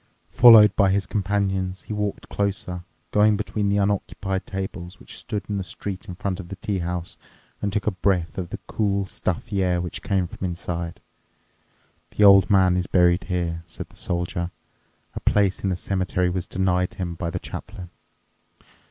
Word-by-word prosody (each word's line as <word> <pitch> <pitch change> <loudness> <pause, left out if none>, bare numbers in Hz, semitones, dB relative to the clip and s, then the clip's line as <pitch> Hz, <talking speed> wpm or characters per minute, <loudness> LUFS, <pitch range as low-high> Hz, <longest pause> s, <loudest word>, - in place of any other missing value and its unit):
Followed 110 -4 +8
by 100 -2 +4
his 100 +1 +1
companions, 95 -2 -1
he - - -6
walked 105 -1 -3
closer, 95 -3 -2 0.3
going 105 0 +4
between 105 -1 -1
the 100 - +2
unoccupied 100 -1 -1
tables, 95 -1 -6
which - - -11
stood 105 - -4
in 105 - -2
the 95 - -2
street 95 +3 -6
in 90 - -6
front 95 +1 -3
of 90 - -7
the 100 - -5
tea 95 +1 -2
house, 90 0 -4 0.4
and 100 - -1
took 105 +1 -1
a 105 - +2
breath 90 -2 0
of 90 -2 -4
the - - -5
cool, 100 -2 0
stuffy 95 +2 -3
air 90 -1 +1
which 85 0 -4
came 95 -3 0
from 85 - -9
inside. 85 -1 -4 1.2
"The 105 - +4
old 100 -3 +8
man 95 -2 +4
is 90 - -1
buried 90 0 +3
here," 85 -2 -2
said 85 - -7
the - - -20
soldier; 85 0 -2 0.6
"a - - -4
place 100 -3 +2
in 100 - +1
the 90 - -1
cemetery 90 -1 0
was 90 -1 -3
denied 90 -1 0
him 90 -2 -3
by 85 0 -4
the - - -3
chaplain. 95 -4 -8
95 Hz, 180 wpm, -24 LUFS, 90-100 Hz, 1.2 s, Followed